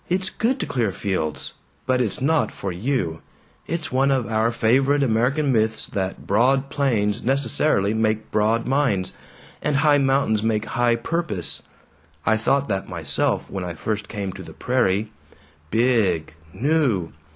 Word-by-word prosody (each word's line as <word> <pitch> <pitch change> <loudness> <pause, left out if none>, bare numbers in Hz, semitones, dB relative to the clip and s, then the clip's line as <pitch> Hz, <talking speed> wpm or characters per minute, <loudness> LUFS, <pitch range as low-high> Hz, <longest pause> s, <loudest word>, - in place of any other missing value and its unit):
"It's 185 +1 0
good 255 +4 0
to - - -1
clear 115 -6 0
fields. 90 -6 -2 0.3
But 130 -1 +2
it's 110 -6 -1
not 155 +4 +1
for 95 - -5
you. 90 - -2 0.5
It's 165 -2 -3
one 135 +2 +2
of 130 -3 +1
our 110 +1 +1
favorite 135 +5 +2
American 135 +5 +2
myths 110 -2 +1
that 95 -2 -4
broad 130 +6 +2
plains 110 -8 +1
necessarily 130 -5 +2
make 110 -1 0
broad 110 +2 +1
minds, 130 -9 +1 0.5
and 150 - 0
high 145 0 +4
mountains 135 -6 +2
make 110 -1 0
high 120 0 +1
purpose. 115 - -2 0.6
I 110 - +4
thought 135 +5 +1
that 95 -3 -2
myself, 80 -5 -1
when 95 -2 -5
I 90 -2 -5
first 105 +2 -3
came 100 -4 -4
to - - -9
the - - -10
prairie. 100 +3 0 0.6
'Big 110 -9 +2 0.2
new.' 125 - +1
115 Hz, 150 wpm, -23 LUFS, 100-135 Hz, 0.6 s, high